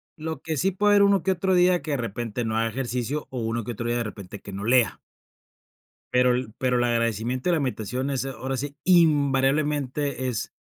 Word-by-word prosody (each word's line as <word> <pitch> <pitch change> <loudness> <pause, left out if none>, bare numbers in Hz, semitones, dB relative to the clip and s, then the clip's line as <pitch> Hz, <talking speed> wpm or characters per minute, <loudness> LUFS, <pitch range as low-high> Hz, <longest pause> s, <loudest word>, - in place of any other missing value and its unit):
lo 160 -3 -5
que 160 -1 -3
sí 190 - +2
puede 205 +2 +2
haber 205 0 +6
uno 200 -3 +3
que 190 - +2
otro 190 +1 +1
día 180 0 +4
que - - -8
de 140 - +1
repente 115 0 -3
no 110 0 -2
haga 115 0 +1
ejercicio 125 +3 -3
o 130 - -4
uno 115 0 -2
que 120 - -5
otro 115 +1 -4
día 120 0 0
de 120 - 0
repente 100 -2 -8
que 100 - -9
no 100 +1 -5
lea. 120 +1 +3 1.1
Pero 125 0 +4
el 125 -3 -3
pero 125 -1 +1
el 120 - +2
agradecimiento 120 - 0
y - - +3
la 165 - +2
meditación 130 0 -2
es, 135 -1 -1
ahora 135 0 -4
sí, 145 +2 -4
invariablemente 145 -4 +2
es, 120 -4 -3
130 Hz, 215 wpm, -25 LUFS, 120-150 Hz, 1.1 s, haber